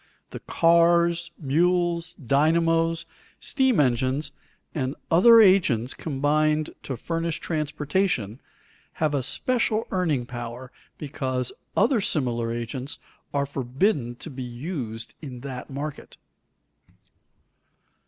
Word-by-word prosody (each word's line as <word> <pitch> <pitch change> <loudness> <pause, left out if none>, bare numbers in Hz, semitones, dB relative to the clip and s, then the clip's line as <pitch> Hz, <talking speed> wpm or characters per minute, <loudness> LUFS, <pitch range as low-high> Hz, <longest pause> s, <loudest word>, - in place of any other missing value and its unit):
The - - -6
cars, 170 0 +3
mules, 170 +3 +1
dynamos, 165 +4 +2 0.3
steam 265 - +2
engines, 130 +2 +1 0.4
and 135 -1 -2 0.2
other 230 +8 +8
agents 185 - +4
combined 150 +1 0
to 130 - -5
furnish 165 +4 -2
transportation, 150 - -1 0.5
have 155 -2 0
a 140 - +1
special 225 - 0
earning 160 -10 0
power 120 +1 -7 0.3
because 130 -4 -3 0.2
other 225 +1 +3
similar 120 -9 0
agents 120 +3 -4 0.3
are 140 0 0
forbidden 135 - -1
to 155 - -6
be 130 -1 -7
used 120 -3 -5
in 130 -5 -8
that 130 -2 -7
market. 140 +2 -6
150 Hz, 100 wpm, -25 LUFS, 130-170 Hz, 0.5 s, other